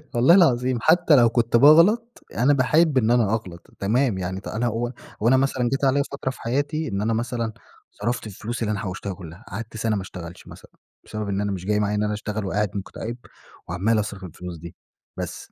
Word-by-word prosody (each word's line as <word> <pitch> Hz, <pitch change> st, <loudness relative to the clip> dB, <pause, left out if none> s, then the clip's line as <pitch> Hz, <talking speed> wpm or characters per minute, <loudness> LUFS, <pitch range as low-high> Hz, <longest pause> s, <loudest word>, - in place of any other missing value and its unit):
والله 130 Hz, +9 st, +6 dB
العظيم، 130 Hz, -8 st, +3 dB
حتى 165 Hz, -1 st, +5 dB
لو 120 Hz, -3 st, +6 dB
كنت 115 Hz, 0 st, +2 dB
باغلط، 185 Hz, -, +5 dB
يعني 120 Hz, -, -2 dB
أنا 145 Hz, +3 st, +5 dB
باحب 140 Hz, +3 st, +3 dB
إن 115 Hz, -1 st, +3 dB
أنا 115 Hz, -3 st, +3 dB
أغلط، 90 Hz, -6 st, -5 dB
تمام، 115 Hz, +2 st, +1 dB
يعني 95 Hz, +1 st, -4 dB
أنا 115 Hz, +3 st, -2 dB
هو 120 Hz, +1 st, -2 dB, 0.3 s
هو 110 Hz, -, +2 dB
أنا 130 Hz, +2 st, +5 dB
مثلًا 130 Hz, -2 st, +1 dB
جيت 135 Hz, +1 st, 0 dB
عليّا 140 Hz, +1 st, +3 dB
فترة 140 Hz, -1 st, -3 dB
في -, -, -14 dB
حياتي 145 Hz, +6 st, -1 dB
إن 100 Hz, -3 st, -2 dB
أنا 110 Hz, +2 st, 0 dB
مثلًا 115 Hz, 0 st, -2 dB, 0.4 s
صرفت 120 Hz, +1 st, -3 dB
الفلوس 110 Hz, +4 st, -6 dB
اللي 105 Hz, -1 st, 0 dB
أنا 105 Hz, -, -2 dB
حوشتها 95 Hz, 0 st, -4 dB
كلها. 90 Hz, +3 st, -11 dB
قعدت 110 Hz, +3 st, -7 dB
سنة 110 Hz, -1 st, 0 dB
ما 100 Hz, -, -2 dB
اشتغلش 90 Hz, -2 st, -9 dB
مثلًا، -, -, -13 dB, 0.3 s
بسبب 105 Hz, -1 st, -5 dB
إن 100 Hz, 0 st, -1 dB
أنا 100 Hz, 0 st, -1 dB
مش 95 Hz, -2 st, -5 dB
جاي 105 Hz, +1 st, +1 dB
معايّا 105 Hz, 0 st, 0 dB
إن 105 Hz, -, 0 dB
أنا 105 Hz, 0 st, -1 dB
أشتغل، 105 Hz, 0 st, -4 dB
وقاعد 105 Hz, +1 st, -1 dB
مُكتئب، 110 Hz, +4 st, -6 dB, 0.5 s
وعمال 105 Hz, +6 st, +1 dB
أصرف 100 Hz, -2 st, -4 dB
الفلوس 90 Hz, 0 st, -8 dB
دي. 85 Hz, +1 st, -10 dB, 0.4 s
بس. -, -, -6 dB
115 Hz, 210 wpm, -23 LUFS, 100-130 Hz, 0.5 s, والله